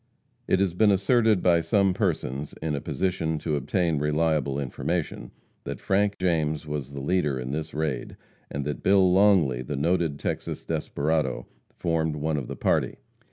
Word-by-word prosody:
It 95 - +3
has 95 -4 +1
been 105 +4 +4
asserted 105 +1 +3
by 85 -2 +4
some 100 +1 +2
persons, 75 - -2
in 80 -1 -2
a 70 - -2
position 80 -4 -1
to 75 0 -2
obtain 80 +3 0
reliable 75 -2 +1
information, 75 +5 -3 0.3
that - - -5
Frank 100 +1 +1
James 80 -4 0
was 75 -2 -5
the 70 - -5
leader 75 -2 0
in 65 +1 -4
this 80 +2 -3
raid, 75 -3 -3 0.3
and 70 0 -4
that 75 - -3
Bill 95 -2 +4
Longley, 90 -11 +4
the 65 +3 -4
noted 80 0 +1
Texas - - -4
desperado, 80 +2 -1 0.3
formed 80 -2 0
one 75 +1 -1
of 65 -4 -4
the - - -5
party. - - +1
80 Hz, 160 wpm, -26 LUFS, 75-90 Hz, 0.3 s, been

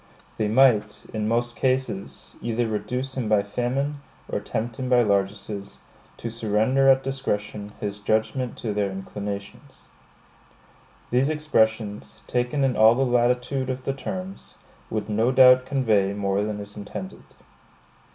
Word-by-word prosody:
They 110 - 0
might, 110 -3 +3
in 105 -1 -1
most 120 +1 0
cases, 130 -7 -2
either 115 0 -1
reduce 125 +5 -3
him 120 -5 -2
by 105 -2 +4
famine, 135 +7 -2 0.3
or - - -2
tempt 115 +1 -4
him 130 -1 -3
by 125 -1 +5
largesses, 100 0 -2 0.4
to 115 - -5
surrender 115 +5 +2
at 135 0 +5
discretion 105 -6 -3
his 105 0 -4
judgment 110 +4 -1
to 110 -3 -3
their 100 -1 0
inclinations. 100 +1 -7 1.3
These 130 +4 +3
expressions, 110 -9 0
taken 125 +3 0
in 130 -2 +2
all 110 +2 +6
the 135 +2 +2
latitude 125 +2 +1
of 130 0 -3
the 135 - -1
terms, 185 +7 -6 0.3
would 105 -2 -3
no 110 +3 +2
doubt 130 -1 +7
convey 110 -8 +2
more 100 -1 0
than 105 0 -3
is 105 0 -8
intended. 100 -2 -7
115 Hz, 140 wpm, -24 LUFS, 105-130 Hz, 1.3 s, doubt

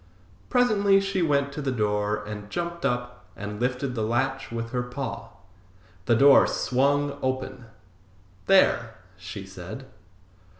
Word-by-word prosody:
Presently 205 -5 +4
she 195 -1 -1
went 140 -3 +1
to 150 - -5
the 135 -2 -1
door 105 -2 0
and 105 -1 -7
jumped 170 +4 -2
up 125 -1 -4
and 105 +2 -6
lifted 125 +1 -1
the 115 - -3
latch 130 +4 -1
with 115 0 -4
her 125 - -1
paw. 125 -2 -5 0.8
The 115 - +4
door 140 +4 +7
swung 140 +2 +1
open. 130 -2 -3 0.8
"There!" 115 - +4 0.2
she 95 +2 -8
said. 95 +7 -9
125 Hz, 130 wpm, -26 LUFS, 110-140 Hz, 0.8 s, door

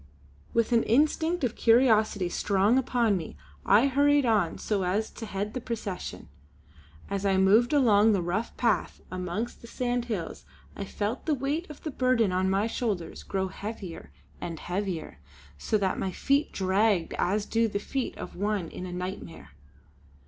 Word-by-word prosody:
With 230 +1 +1
an 235 -1 +5
instinct 310 +8 +2
of 245 -2 0
curiosity 220 -5 +4
strong 200 +6 +2
upon 240 -5 +1
me 165 -4 -5 0.3
I 225 +6 +6
hurried 285 +1 +3
on 210 -8 +2
so 205 -3 -1
as 200 +5 -1
to 225 - -8
head 205 +1 -3
the 255 - -4
procession. 200 - -5 0.8
As 200 0 -3
I 195 -1 +2
moved 205 +6 +4
along 225 -7 +5
the 195 - +1
rough 195 +7 -2
path 225 -7 0
amongst 185 +5 -4
the 235 - -11
sandhills 240 -7 -3 0.3
I 200 - -5
felt 210 +8 -3
the 310 - +3
weight 285 +6 -2
of 300 - -11
the 310 - -3
burden 255 -6 +2
on 185 +1 +1
my 195 +2 +2
shoulders 215 -7 -3
grow 190 -1 -2
heavier 195 - -7 0.3
and 165 -2 -5
heavier, 180 - -4 0.4
so 215 - +1
that 195 -2 -1
my 190 - -1
feet 280 - +1
dragged 190 -1 +1
as 205 +3 +1
do 230 0 +1
the 205 - -2
feet 260 +5 -3
of - - -7
one 200 -3 -1
in 185 - -7
a - - -7
night 180 +2 -4
mare. 165 - -12
210 Hz, 165 wpm, -28 LUFS, 190-240 Hz, 0.8 s, I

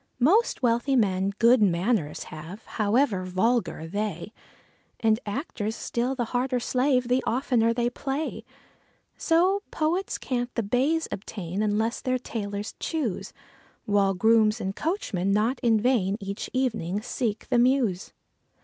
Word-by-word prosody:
Most 340 - +3
wealthy 240 +3 +2
men 195 -4 +2
good 235 +1 +5
manors 180 -3 +1
have, 165 +8 -9
however 215 -2 +1
vulgar 185 -3 0
they; 200 +2 -4 0.7
And 220 -1 +2
actors 220 -2 -3
still 245 +3 -2
the 245 - -1
harder 250 +1 +1
slave 255 0 +1
the 250 +1 +2
oftener 240 -2 +2
they 240 +1 0
play. 275 +5 -3 0.7
So 370 +4 +2
poets 340 +5 -1
can't 245 -1 -2
the 230 - 0
baize 270 +10 +1
obtain, 195 -1 -5
unless 215 +2 0
their 255 0 0
tailors 205 -4 -5
choose; 290 - -3 0.5
While 200 -2 +2
grooms 220 +2 +4
and 195 -2 -3
coachmen 200 - -1
not 220 +6 +1
in 230 -4 +3
vain 210 -5 +1
each 200 0 -5
evening 220 -7 -1
seek 225 -3 -3
the 245 -2 +3
Mews. 240 -7 +2
230 Hz, 130 wpm, -26 LUFS, 200-255 Hz, 0.7 s, good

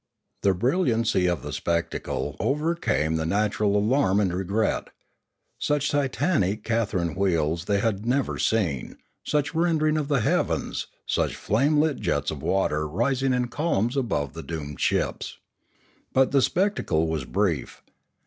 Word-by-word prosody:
The 95 -1 +3
brilliaucy 115 - +2
of 85 - -3
the - - -5
spectacle 85 0 -2
overcame 135 - 0
the 80 - -2
natural 105 +1 +1
alarm 105 -2 +2
and 95 -4 +1
regret 95 +4 0 0.7
Such 145 0 0
titanic 135 - 0
Catherine 100 -8 0
wheels 85 -3 0
they 100 0 +1
had 105 -2 0
never 125 +3 0
seen, 90 - 0 0.3
such 150 0 0
rending 160 -2 +2
of 145 - -2
the 140 -5 +2
heavens, - - 0 0.2
such - - 0
flame 140 +9 +1
lit 155 -2 +2
jets - - 0
of - - -6
water 75 -5 0
rising 130 - 0
in 125 -1 0
columns 125 -5 0
above 75 - -1
the - - -6
doomed 75 -3 -6
ships. - - -1 0.8
But 130 0 +3
the 140 -1 +4
spectacle 150 - +1
was 80 -3 -2
brief. 90 -6 -1
110 Hz, 140 wpm, -25 LUFS, 90-140 Hz, 0.8 s, the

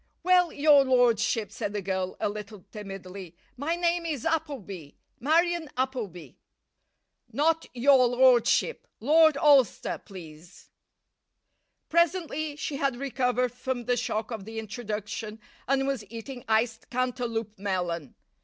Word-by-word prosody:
"Well, 360 -1 +4
your 290 -1 +5
lordship," 235 -4 +2
said 205 - -4
the 205 - -2
girl, 185 -1 -2
a - - 0
little 210 -1 -7
timidly, 195 -3 -8 0.2
"my 295 +6 -1
name 345 0 0
is 305 -7 -4
Appleby 255 - -3 0.2
Marion 330 +3 +1
Appleby." 245 -10 -3 1.0
"Not 325 +2 +1
'your 255 0 +5
lordship'; 250 - +3
Lord 310 +3 +5
Alcester, 280 -6 +3
please." 170 -3 -13 1.2
Presently 330 -3 0
she 295 -1 -4
had 275 -2 0
recovered 250 -1 0
from 250 0 -4
the 245 - +2
shock 220 -1 -2
of 215 -4 -5
the 225 +1 -8
introduction, 215 -1 -5 0.3
and 270 +1 +2
was 270 -5 -2
eating 240 +2 -8
iced 225 +1 0
Cantaloup 240 -4 -2
melon. 175 -7 -3
245 Hz, 120 wpm, -27 LUFS, 210-285 Hz, 1.2 s, your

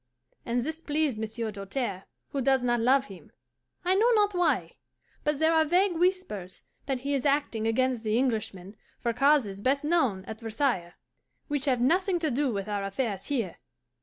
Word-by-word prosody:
And 240 0 0
this 320 +3 -5
pleased 295 -7 0
Monsieur 220 0 -3
Doltaire, 200 0 -4 0.2
who 275 - -2
does 265 0 +2
not 240 -1 +2
love 260 +4 +3
him. 195 -6 -13 0.5
I 365 - +4
know 435 +5 +4
not 415 -1 +3
why, 355 -1 0 0.5
but 300 -1 +1
there 320 +2 +3
are 320 -1 +5
vague 355 +4 +2
whispers 335 - -1 0.2
that 265 -3 -1
he 280 +2 -2
is 270 -3 0
acting 275 -6 +1
against 250 +1 +1
the 215 0 +1
Englishman 215 -6 -2 0.2
for 235 - -1
causes 245 -6 +2
best 275 +5 +1
known 270 - +1
at 220 +1 -7
Versailles, 225 -6 -1 0.5
which 290 -2 0
have 255 -4 +1
nothing 360 +8 +2
to 320 -4 -1
do 270 +1 +1
with 200 -2 -3
our 205 -1 -2
affairs 195 0 -3
here. 230 -11 -2
255 Hz, 175 wpm, -28 LUFS, 220-300 Hz, 0.5 s, are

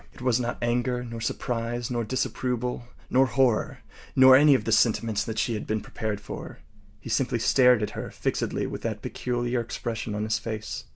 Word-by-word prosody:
It - - -14
was 125 -2 +2
not 120 -1 -2
anger, 125 +1 0
nor 115 -1 -7
surprise, 120 +1 -3
nor 120 -1 -1
disapproval, 125 0 -2 0.2
nor 130 +1 +4
horror, 130 -5 +1 0.3
nor 130 0 +8
any 145 +1 +7
of 120 - 0
the 115 - -2
sentiments 110 -2 +2
that 110 0 -5
she 120 - 0
had 105 - -4
been 110 0 0
prepared 110 -1 -4
for. 105 - -8 0.4
He - - -11
simply - - +1
stared 125 -4 +4
at - - -2
her - - -6
fixedly - - -2
with - - -5
that - - -4
peculiar 120 0 -2
expression 115 -2 -4
on 105 - -2
his 110 0 0
face. 110 -2 -5
120 Hz, 185 wpm, -26 LUFS, 110-125 Hz, 0.4 s, nor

